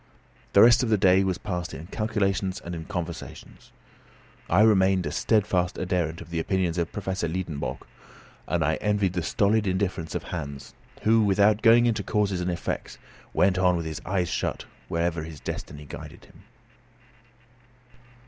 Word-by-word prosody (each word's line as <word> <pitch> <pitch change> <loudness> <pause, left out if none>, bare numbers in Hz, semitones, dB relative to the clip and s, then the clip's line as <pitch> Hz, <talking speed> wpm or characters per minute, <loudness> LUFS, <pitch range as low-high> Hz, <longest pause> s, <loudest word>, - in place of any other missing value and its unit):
The 100 - +8
rest 120 +1 +7
of 125 - 0
the 110 - +4
day 95 -1 +4
was 95 -1 -1
passed 90 -4 -4
in 75 +5 -8
calculations 100 -2 -1
and 85 - -5
in 80 -1 -6
conversations. 85 -2 -7 0.8
I 90 +5 +4
remained 95 -4 +4
a 75 - -2
steadfast 95 -2 +1
adherent 90 -3 -1
of 85 0 -11
the 85 - -1
opinions 90 0 0
of 85 0 -2
Professor 95 -2 -3
Liedenbrock, 80 -7 -4 0.6
and - - 0
I - - +1
envied 105 -3 0
the 90 - -1
stolid 105 +4 +1
indifference 95 -3 -2
of - - -2
Hans, 70 -1 -6 0.3
who, 110 +1 +4
without 105 +1 +3
going 120 +1 +6
into 115 -2 +1
causes 100 -3 0
and 90 - -1
effects, 85 - -4 0.3
went 95 +1 +2
on 90 -1 +3
with 85 - -4
his 80 -1 -5
eyes 90 -2 -1
shut - - -2 0.2
wherever 85 -1 -1
his 80 -2 -8
destiny 75 +1 -6
guided - - -10
him. - - -20
95 Hz, 160 wpm, -26 LUFS, 85-100 Hz, 0.8 s, The